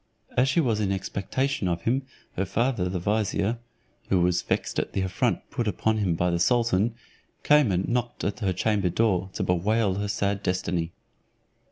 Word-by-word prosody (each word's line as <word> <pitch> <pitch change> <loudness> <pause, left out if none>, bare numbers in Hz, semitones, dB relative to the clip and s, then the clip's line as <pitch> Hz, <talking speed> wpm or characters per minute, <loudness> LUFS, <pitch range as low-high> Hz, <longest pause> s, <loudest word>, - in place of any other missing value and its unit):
As 130 +2 +3
she 145 - +2
was 115 -9 +1
in 100 -2 0
expectation 100 +4 -1
of 85 -1 -1
him, 130 +3 0 0.3
her 95 - 0
father 115 -4 0
the 90 - -2
vizier. 105 +3 0 0.5
(who 95 - +3
was 90 0 +2
vexed - - -1
at - - -3
the 95 - 0
affront 95 +6 -1
put 120 -5 -2
upon 110 +1 +1
him 90 -5 +1
by 90 +2 +1
the 85 - 0
sultan) 115 +1 +2 0.5
came 145 -7 +5
and 90 +1 0
knocked 120 0 -2
at 100 - -2
her 100 -4 0
chamber 100 0 +1
door, 95 -1 +1
to - - -2
bewail 100 +2 +1
her 105 - -1
sad 100 0 -1
destiny. 90 -2 -1
100 Hz, 180 wpm, -26 LUFS, 90-115 Hz, 0.5 s, came